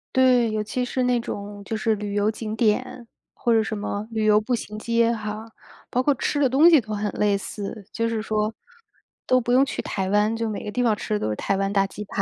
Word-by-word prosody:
对， 250 -3 +4
尤 215 0 -1
其 250 +4 -2
是 255 - -2
那 245 -1 +2
种 205 -2 -6
就 220 - -4
是 220 0 +1
旅 205 0 -5
游 205 +1 +2
景 220 0 -4
点， 235 +2 0 0.3
或 240 - -1
者 225 -1 +4
什 220 - -3
么 205 0 -4
旅 220 -1 -1
游 210 0 +5
步 225 +4 -2
行 215 -2 -4
街 230 +1 +2
哈， 215 -1 -4 0.5
包 250 - 0
括 290 - +3
吃 285 +2 -1
的 280 - +4
东 290 +7 +6
西 320 -4 +7
都 215 -2 -6
很 210 0 -2
类 205 -1 +2
似。 200 +1 -6
就 230 0 -1
是 225 -1 -1
说 215 0 -1 0.7
都 255 0 +3
不 240 - -2
用 260 +2 +5
去 - - -4
台 190 -2 -3
湾， 210 +2 +2
就 230 -1 -1
每 215 - -4
个 210 - -5
地 250 +2 0
方 220 -3 +3
吃 210 - -3
的 210 - 0
都 110 - -1
是 - - -2
台 195 - -1
湾 195 +1 -1
大 195 -1 +3
鸡 210 +2 -8
排。 195 - -2
215 Hz, 270 characters per minute, -24 LUFS, 210-240 Hz, 0.7 s, 西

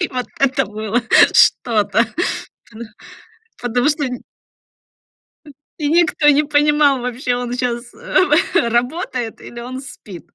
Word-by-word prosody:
и 360 - 0
вот 250 -3 -4
это 270 0 +2
было 215 +3 -3 0.3
что-то. 220 -1 +3 0.7
Ты 225 - -14
ных 235 -2 -8 0.7
потому 245 +3 0
что 290 -2 -2
нь 250 -1 -7 1.2
Э, - - -12 0.3
и 295 -2 -1
никто 325 -2 +2
не 295 +1 +5
понимал 295 -2 +2
вообще, 250 0 -2
он 245 0 -4
щас, 240 -1 -3
э 380 - +1
работает 245 -1 -2
или 240 - -10
он 255 +2 -7
спит. 200 -9 -12
250 Hz, 135 wpm, -18 LUFS, 235-290 Hz, 1.2 s, не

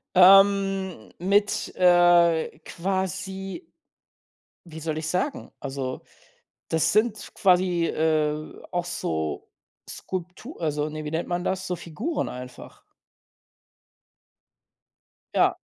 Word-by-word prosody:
Ähm, 195 - +5
mit, 200 +3 +1
äh, 175 -3 +4
quasi 190 - -4 1.0
wie 160 -1 -9
soll 155 0 -3
ich 155 0 -3
sagen? 185 - -2
Also, 135 -2 -4 0.7
das 160 -1 +2
sind 215 0 +1
quasi, 180 -2 +3
äh, 155 -1 -1
auch 175 -1 -1
so 80 - -3 0.4
Skulptu 185 - -7
also, 150 -2 -1
ne, 155 0 -6
wie 150 - -4
nennt 165 +1 -2
man 175 0 -1
das? 190 0 -2
So 180 - -1
Figuren 175 - -3
einfach. 125 0 -10 2.5
Ja. - - +3
175 Hz, 100 wpm, -25 LUFS, 155-190 Hz, 2.5 s, Ähm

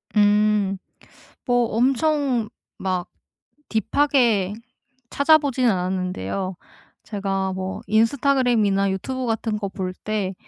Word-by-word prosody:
음. 205 -1 +3 0.7
뭐 245 -2 +2
엄청 265 -2 +1 0.3
막 185 -1 -2 0.6
딥하게 230 -4 +2 0.6
찾아보진 280 -4 +3
않았는데요. 185 - -2 0.5
제가 195 -2 -2
뭐 190 0 -5
인스타그램이나 225 -4 +2
유튜브 255 +7 -3
같은 225 -1 -1
거 200 -2 -3
볼 185 -2 -4
때 205 -3 -3
210 Hz, 200 characters per minute, -22 LUFS, 190-250 Hz, 0.7 s, 음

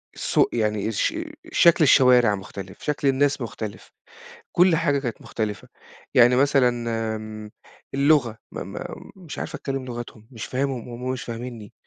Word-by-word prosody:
السوق - - +2
يعني 105 -2 0
الش 115 - 0 0.4
شكل 170 -2 +5
الشوارع 125 -6 +6
مختلف، 95 0 -9
شكل 145 -1 -1
الناس 140 0 +2
مختلف، 110 -2 -6 0.6
كُلّ 180 -1 +5
حاجة 145 -4 +2
كانت 120 -5 -4
مختلفة، 105 -2 -4 0.5
يعني 125 0 +6
مثلًا 135 -1 +4 0.5
آمم، 110 0 -8 0.4
اللغة 140 -6 +3
م - - -7 0.2
م - - -6 0.3
مش 175 -6 -9
عارف - - -5
أتكلم 135 -1 -4
لغتهم، 120 -2 -8
مش 115 - -6
فاهمهم 130 -2 -2
وهُم 125 +2 -4
مش 130 - -5
فاهمينني، 115 -2 -7
125 Hz, 140 wpm, -24 LUFS, 110-140 Hz, 0.6 s, الشوارع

